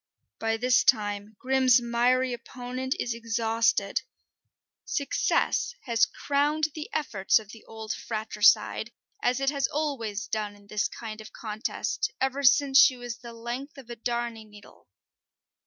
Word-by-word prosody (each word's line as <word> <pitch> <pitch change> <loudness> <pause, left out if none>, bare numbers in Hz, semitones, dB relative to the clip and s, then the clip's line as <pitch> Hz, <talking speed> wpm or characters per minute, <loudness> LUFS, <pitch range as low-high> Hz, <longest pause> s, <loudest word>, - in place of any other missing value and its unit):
By 225 0 0
this 250 +2 +3
time 205 -2 +1
Grim's 260 -1 +4
miry 245 +2 +2
opponent 250 +2 -4
is 240 - -1
exhausted: 225 -3 0 0.8
success 285 - 0
has 230 -3 +3
crowned 295 +2 0
the 305 -1 -6
efforts 210 -11 +2
of 215 -3 -5
the 225 - -13
old 220 -1 -5
fratricide, 215 +1 +2 0.3
as 250 +1 +1
it 275 0 +1
has 280 -2 0
always 255 -8 -2
done 210 -1 -3
in 205 0 -19
this 210 +1 -1
kind 220 -1 -8
of 215 - -12
contest, 215 -1 -3
ever 265 +1 0
since 275 +1 +5
she 275 -2 +6
was 245 -1 -6
the 240 -1 -10
length 240 +5 -6
of 250 -3 -11
a - - -5
darning 235 -2 -3
needle. 210 -1 -17
235 Hz, 140 wpm, -27 LUFS, 220-260 Hz, 0.8 s, she